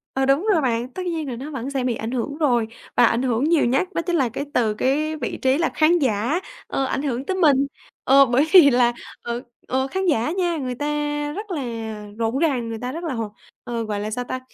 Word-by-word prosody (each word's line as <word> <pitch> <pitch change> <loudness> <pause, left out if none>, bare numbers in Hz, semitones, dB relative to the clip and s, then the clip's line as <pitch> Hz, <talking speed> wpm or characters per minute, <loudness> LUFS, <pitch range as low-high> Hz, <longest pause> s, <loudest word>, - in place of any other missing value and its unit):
Ờ, 265 0 +2
đúng 275 +9 +2
rồi 320 - +3
bạn, 245 0 -1
tất 370 -1 -5
nhiên 325 -4 -2
là 240 - -4
nó 280 +6 -7
vẫn 265 -1 -4
sẽ 270 -2 -2
bị 245 -2 0
ảnh 225 +2 -4
hưởng 270 +4 -3
rồi 240 -8 +2 0.3
và 240 - +6
ảnh 230 +2 +2
hưởng 250 -1 0
nhiều 320 -3 +3
nhất 270 +9 +1
đó 335 - 0
chính 345 +1 -1
là 260 -6 +2
cái 280 +5 -4
từ 220 -3 +2
cái 300 +7 0
vị 260 -6 -4
trí 265 +2 +3
là 335 - +1
khán 335 +3 +4
giả, 250 - +1 0.3
ờ, 270 - -1
ảnh 270 - -2
hưởng 265 -1 -2
tới 380 - -2
mình. 280 -5 +4 0.4
Ờ, 275 +1 +6
bởi 255 +5 +2
vì 340 -7 +9
là 240 -1 +3 0.3
ờ, 235 +1 -4 0.3
ờ, 265 +1 0
khán 380 +6 -2
giả 295 -4 +1
nha, 350 -3 0
người 255 -3 -3
ta 290 - -4 0.5
rất 415 -1 -6
là 305 -5 -2 0.6
rộn 230 +3 0
ràng, 265 -8 0
người 225 - -4
ta 250 +1 -3
rất 335 +4 -6
là 315 -6 -2
hò 230 -2 -2 0.4
ờ, 235 -1 -3
gọi 210 -2 -3
là, 215 +1 -4
sao 245 +2 -2
ta? 255 +1 -4
265 Hz, 250 wpm, -22 LUFS, 240-310 Hz, 0.6 s, vì